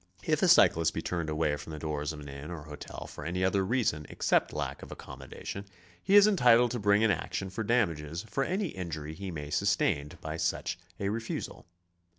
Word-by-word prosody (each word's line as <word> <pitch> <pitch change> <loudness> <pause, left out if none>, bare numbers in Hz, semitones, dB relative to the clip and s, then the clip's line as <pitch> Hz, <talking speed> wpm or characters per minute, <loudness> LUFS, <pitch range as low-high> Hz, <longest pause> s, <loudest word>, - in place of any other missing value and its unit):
If - - +1
a - - +4
cyclist 80 -1 +5
be 80 - -2
turned 85 -3 -2
away 75 -1 0
from 75 +2 -8
the - - -5
doors 75 -1 -2
of 75 - -8
an 70 - -9
inn 70 +2 -8
or 85 -3 -6
hotel 75 -1 -8
for - - -9
any 90 +4 -2
other 95 +1 +2
reason 95 - 0
except - - +1
lack - - -4
of - - -10
accommodation, 100 +1 -8 0.4
he 195 - +3
is 205 0 +9
entitled 125 - +5
to 120 - -2
bring 100 +1 +4
an 110 - +4
action 95 -1 -3
for 110 +4 -3
dam 115 -4 +3
ages 80 +5 -6
for 135 +5 -1
any 185 +4 -1
injury 80 -5 -5
he 95 +4 -6
may 75 -4 -6
sustain 70 0 +1
by 80 0 -5
such 85 - -1 0.2
a 100 - 0
refusal. 115 -5 -4
85 Hz, 205 wpm, -30 LUFS, 75-110 Hz, 0.4 s, is